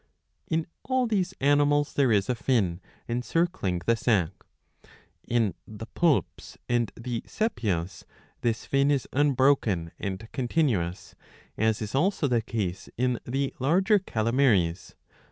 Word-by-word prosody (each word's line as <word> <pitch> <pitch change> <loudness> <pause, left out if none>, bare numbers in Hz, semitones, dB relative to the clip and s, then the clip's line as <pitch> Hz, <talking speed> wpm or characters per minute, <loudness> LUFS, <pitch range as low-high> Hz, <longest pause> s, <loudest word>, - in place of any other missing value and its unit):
^® - - -42 0.4
In 160 0 0 0.2
all 260 -1 0
these 190 -5 -1
animals 145 +1 +3
there 135 -4 +3
is 100 -3 +2
a 125 - +1
fin, 105 -8 0 0.3
encircling 120 - -1
the 115 - +3
sac. 105 -8 +1 1.0
In 115 -5 +1
the 110 +1 -8
Poulps 160 +4 0
and 120 -3 +1
the 115 0 -4
Sepias 100 - -2 0.4
this 115 -2 -1
fin 140 +1 +2
is 140 -3 +1
unbroken 130 - +2
and 100 +2 -4
continuous, 120 - -1 0.4
as 110 0 +1
is 105 - -6
also 160 +2 +1
the 120 -3 +2
case 105 -6 -4
in 125 0 +1
the 135 +2 -1
larger 190 - +3
calamaries. 110 - +1
120 Hz, 130 wpm, -27 LUFS, 105-145 Hz, 1.0 s, animals